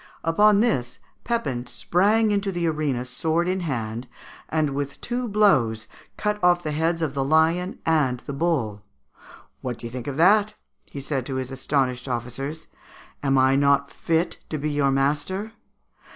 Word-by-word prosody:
Upon 205 +5 +4
this, 135 - 0 0.3
Pepin 135 - -2
sprang 210 - +2
into 200 -1 0
the 175 -2 -2
arena 150 -6 -1
sword 160 +7 -1
in 185 +1 0
hand, 120 -7 -3 0.4
and 155 -2 +1
with 140 0 -4
two 245 0 -3
blows 130 - +2 0.3
cut 210 -1 -2
off 175 0 +4
the 155 - -2
heads 165 +2 0
of 150 -4 -1
the 135 - 0
lion 160 +6 +2
and 150 -6 +2
the 140 - -6
bull. 135 -10 -1 0.8
"What 125 -2 -4
do - - -9
you 115 - -6
think 125 -1 -6
of 140 -1 -4
that?" 205 +5 +4 0.3
he 140 - -7
said 135 -1 -2
to 135 - -3
his 130 0 -3
astonished 135 -1 -1
officers. 130 +5 -4 0.6
"Am 135 -1 +2
I 130 +1 +4
not 140 0 +3
fit 165 +1 -1
to 155 - -2
be 150 +1 -2
your 145 -1 +2
master? 145 +10 0
150 Hz, 165 wpm, -24 LUFS, 130-180 Hz, 0.8 s, Upon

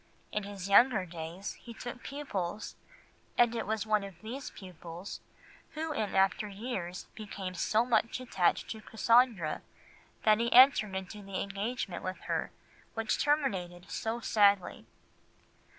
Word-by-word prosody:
In 210 - -1
his 200 -2 -6
younger 205 -1 +6
days 170 +3 -6
he 235 -1 -10
took 245 +1 -7
pupils, 215 -10 -4 0.6
and 240 -1 +5
it 230 - -3
was 220 0 -1
one 215 -1 +2
of 195 -4 -9
these 255 +5 -5
pupils 180 0 -9 0.5
who 315 0 -3
in 210 -7 -2
after 195 +2 +3
years 195 -4 -5
became 200 -4 -6
so 215 +6 +2
much 230 0 +1
attached 215 -8 +1
to 220 - -6
Cassandra 225 -7 +3 0.6
that 215 0 +5
he 235 0 +1
entered 245 -6 +7
into 190 +2 -5
the 195 -1 -5
engagement 200 0 -3
with 185 0 -4
her - - -2 0.5
which 225 -1 0
terminated 195 -12 0
so 225 +1 -2
sadly. 200 -4 +3
210 Hz, 135 wpm, -31 LUFS, 190-235 Hz, 0.6 s, entered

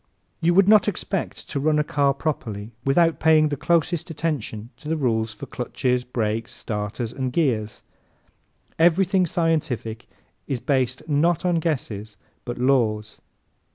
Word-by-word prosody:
You 170 +1 +2
would 195 0 +6
not 215 0 +6
expect 195 -2 -3
to 140 - -1
run 150 +2 +2
a 150 - +3
car 140 -1 +2
properly 115 -8 -4
without 165 +4 +3
paying 155 -1 +5
the 145 - -1
closest 170 +3 0
attention 130 -9 -3
to 150 - -8
the 160 - 0
rules 115 -5 0
for - - -9
clutches, 125 0 -1
brakes, 115 -2 -2
starters 105 +2 -4
and 130 -2 -2
gears. 120 -9 0 1.0
Everything 180 +2 +4
scientific 145 -9 -1 0.4
is 135 -4 -2
based 130 +1 0
not 160 +4 +2
on 175 -2 +2
guesses 110 - -3 0.3
but 120 -1 -4
laws. 115 -5 +1
140 Hz, 140 wpm, -23 LUFS, 115-165 Hz, 1.0 s, would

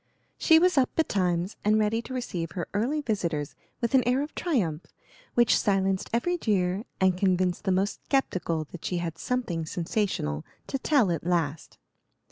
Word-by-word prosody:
She 320 - +6
was 355 -3 +4
up 255 - +3
betimes 185 - 0
and 215 +1 +4
ready 215 +1 +1
to 255 - -9
receive 170 -10 -4
her 175 - -4
early 250 +9 0
visitors 170 - -2 0.3
with 235 +1 -1
an 265 - +6
air 255 +3 +2
of 300 - -7
triumph, 185 - -1 0.5
which 240 -1 +5
silenced 195 -2 +1
every 350 +10 0
jeer 195 - 0
and 190 -1 +3
convinced 185 -1 +1
the 190 - +2
most 195 +3 -1
skeptical 180 - 0
that 175 - -9
she 180 - -1
had 170 -1 -4
something 235 -10 -2
sensational 165 - -2 0.2
to 270 - -3
tell 255 - +3
at 165 - -2
last. 165 -3 -1
195 Hz, 165 wpm, -27 LUFS, 175-245 Hz, 0.5 s, She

